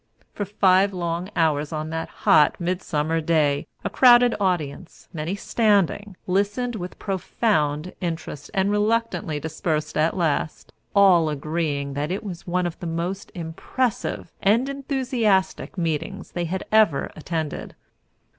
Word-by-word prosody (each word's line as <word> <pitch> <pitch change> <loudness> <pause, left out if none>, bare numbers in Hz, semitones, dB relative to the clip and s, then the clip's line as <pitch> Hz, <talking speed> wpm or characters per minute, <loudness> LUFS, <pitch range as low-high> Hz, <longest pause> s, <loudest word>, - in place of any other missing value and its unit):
For 205 - -3
five 195 0 +3
long 175 0 -3
hours 150 -2 +1
on 155 0 -4
that 160 0 -3
hot 150 - +3
midsummer 165 -3 -1
day 155 -3 +1 0.2
a - - -1
crowded 245 -1 +6
audience, 175 -4 -2
many 165 +3 -3
standing, 205 -2 +1
listened 205 +6 0
with 180 -3 -6
profound 180 -5 -1
interest 165 -4 -4
and 195 -1 +1
reluctantly 210 -6 0
dispersed 155 0 -2
at 155 +4 +1
last, 155 -2 -1 0.2
all 180 -5 +6
agreeing 150 -1 -2
that 145 +2 -2
it 190 +5 -3
was 185 -5 -7
one 180 +1 0
of 170 -2 -4
the 175 - -5
most 175 +4 -3
impressive 180 +8 -3
and 225 +7 +3
enthusiastic 255 -10 0
meetings 170 +4 -3
they 175 -1 -2
had 185 +3 -3
ever 215 -10 +3
attended. 160 -1 -4
175 Hz, 130 wpm, -24 LUFS, 160-200 Hz, 0.2 s, crowded